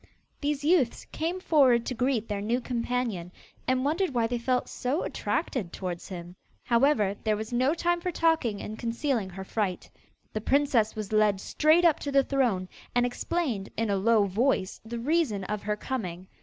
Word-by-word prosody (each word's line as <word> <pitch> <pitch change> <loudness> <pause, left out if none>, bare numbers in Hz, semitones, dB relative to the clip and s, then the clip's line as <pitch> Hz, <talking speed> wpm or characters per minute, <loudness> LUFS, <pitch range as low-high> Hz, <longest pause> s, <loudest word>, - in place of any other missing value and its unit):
These 290 -1 -1
youths 300 -6 +2
came 335 +4 -2
forward 265 -9 +4
to - - -2
greet 245 -2 0
their 205 -2 -2
new 230 +4 0
companion, 235 -7 -2 0.4
and 255 +1 +1
wondered 325 0 0
why 235 -1 +3
they 240 +1 -1
felt 250 +1 0
so 265 +7 -2
attracted 205 - -2
towards 180 -2 -5
him. 175 -1 -8 0.3
However, 235 -5 +3
there 215 -1 +1
was 220 +2 -6
no 260 +6 +2
time 345 0 0
for 360 - -1
talking 315 -12 +1
and 215 +1 -6
concealing 235 -3 -1
her 190 +1 -7
fright. 190 -2 -3 0.4
The 215 - -2
princess 255 -4 +2
was 215 -1 -5
led 210 -2 +3
straight 310 - +3
up 325 -3 +4
to 285 - -4
the 275 0 +5
throne, 245 -10 +1 0.3
and 245 0 +4
explained, 245 - -2
in 225 -1 0
a - - +2
low 210 +1 +3
voice, 200 0 0
the 230 +2 -6
reason 255 - +1
of 210 +2 -3
her 210 0 -1
coming. 185 -8 -4
235 Hz, 180 wpm, -28 LUFS, 210-280 Hz, 0.4 s, the